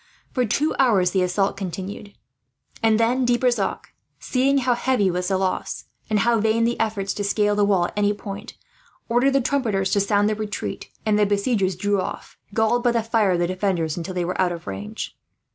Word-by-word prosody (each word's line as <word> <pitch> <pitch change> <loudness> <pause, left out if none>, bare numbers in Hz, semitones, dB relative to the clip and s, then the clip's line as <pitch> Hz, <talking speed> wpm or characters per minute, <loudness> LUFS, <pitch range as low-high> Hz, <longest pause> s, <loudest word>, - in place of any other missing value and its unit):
For 250 -2 +1
two 285 +8 +1
hours 200 -9 +4
the 190 - +1
assault 185 +2 +1
continued, 195 +2 -6 0.7
and 225 -1 +3
then 245 +3 +2
De 245 -1 +3
Brissac, 240 -5 -1 0.2
seeing 270 +2 +1
how 255 -2 +2
heavy 240 -5 +1
was 180 +1 -2
the 190 0 +1
loss, 190 -1 -2 0.3
and 210 -2 +2
how 235 0 +3
vain 220 +2 +2
the 235 +1 0
efforts 205 -3 -1
to 205 - -3
scale 205 +1 +1
the 205 - +2
wall 195 -4 +3
at - - -6
any 205 0 +2
point, 205 +1 -7 0.5
ordered 245 +4 +3
the 275 - +3
trumpeters 220 -8 0
to 200 - +3
sound 205 +1 +2
the 215 - +1
retreat; 215 -1 -5
when 215 -2 +2
the 210 -1 +3
besiegers 200 -2 +1
drew 200 +1 0
off, - - -6 0.2
galled 220 +3 +2
by 240 -1 +3
the 230 -2 +1
fire 220 -4 +2
of - - +1
the - - +3
defenders 180 -4 -1
until 180 +2 -5
they 175 -1 0
were 180 - -1
out 180 -1 +2
of 170 -1 -7
range. 100 +1 -6
205 Hz, 205 wpm, -23 LUFS, 190-230 Hz, 0.7 s, hours